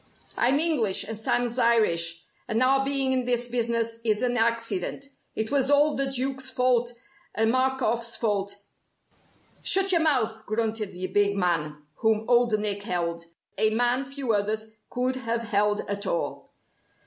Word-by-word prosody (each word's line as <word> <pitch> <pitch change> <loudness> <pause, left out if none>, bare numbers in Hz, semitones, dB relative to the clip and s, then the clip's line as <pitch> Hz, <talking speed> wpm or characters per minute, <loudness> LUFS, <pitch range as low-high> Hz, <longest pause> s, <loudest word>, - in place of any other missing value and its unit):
I'm 260 +4 +2
English, 280 - +2
and 220 +2 -6
Sam's 240 +3 -1
Irish, 170 -8 +2 0.2
and 225 +3 +1
our 270 +1 +3
being 270 -1 +1
in 255 -1 0
this 245 -1 0
business 230 -1 -1
is 215 0 +1
an 245 -1 0
accident. 230 0 -1 0.3
It 220 0 -3
was 275 -2 +2
all 290 +1 +4
the 275 0 +1
Duke's 265 0 -1
fault 250 -2 +1 0.4
and 225 +1 +2
Markoff's 250 -3 0
fault 200 -3 -1 0.6
" - - -34
"Shut 385 0 +4
your 340 -2 +3
mouth," 225 -8 0
grunted 215 -1 -2
the 180 +1 -5
big 200 +2 +1
man 155 -5 -1
whom 220 -1 +1
Old 240 -2 +3
Nick 205 -1 -1
held 170 -4 -3 0.3
a 215 - +4
man 245 +4 +1
few 275 -3 -3
others 215 +2 -1 0.2
could 255 +1 -1
have 235 -2 -2
held 210 -1 +1
at 200 0 -3
all. 170 - -3
230 Hz, 155 wpm, -26 LUFS, 210-255 Hz, 0.6 s, all